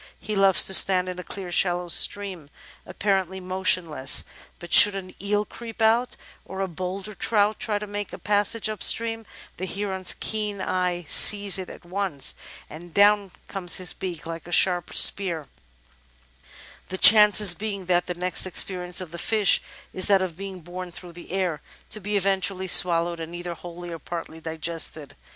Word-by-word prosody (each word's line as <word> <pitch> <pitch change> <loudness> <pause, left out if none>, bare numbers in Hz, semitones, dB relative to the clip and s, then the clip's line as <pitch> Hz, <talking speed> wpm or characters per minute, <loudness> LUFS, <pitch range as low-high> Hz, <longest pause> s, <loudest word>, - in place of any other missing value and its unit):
He 215 - -5
loves 195 -1 +4
to 190 - +3
stand 185 -1 +4
in 180 0 -7
a - - -7
clear, 185 -2 -8
shallow 175 0 -1
stream, 185 -3 0 0.4
apparently 190 -2 -2
motionless, 180 -6 0 0.3
but 175 -1 -9
should 205 -1 +8
an 185 -1 -8
eel 205 +1 -1
creep 230 0 -11
out, 225 +3 +1 0.3
or 190 - -9
a 195 - -2
bolder 185 +4 -7
trout 210 0 0
try 210 -2 -2
to 210 - -6
make 205 0 -6
a - - -8
passage 210 +2 0
up 215 -1 -6
stream, 225 -2 -1 0.3
the 185 - -5
Heron's 190 -1 -1
keen 210 -2 -3
eye 180 -2 -2
sees 200 +1 +5
it 185 - -7
at - - -13
once 185 -6 -1 0.3
and 170 +3 -12
down 205 -1 +3 0.2
comes 185 -3 0
his 185 -2 0
beak 175 -4 -7
like 165 +1 -8
a - - -11
sharp 175 0 +2
spear, 170 -7 +2 1.4
the 185 - -4
chances 210 -2 +7
being 200 -1 -6
that 175 0 0
the 180 - -4
next 180 +1 +1
experience 180 0 +2
of 180 -3 -9
the 170 - -8
fish 215 -1 +2 0.3
is 185 - 0
that 195 -2 +3
of 175 -3 -6
being 190 0 -9
borne 180 +2 -8
through 175 0 -12
the 175 0 -13
air, 180 -5 -2 0.3
to 215 - -2
be 205 +1 -2
eventually 190 -1 -1
swallowed 170 -1 +3
and 165 +1 -8
either 175 0 -6
wholly 175 +1 -10
or 165 - -7
partly 165 0 -8
digested. 160 -2 -4
185 Hz, 175 wpm, -23 LUFS, 175-200 Hz, 1.4 s, should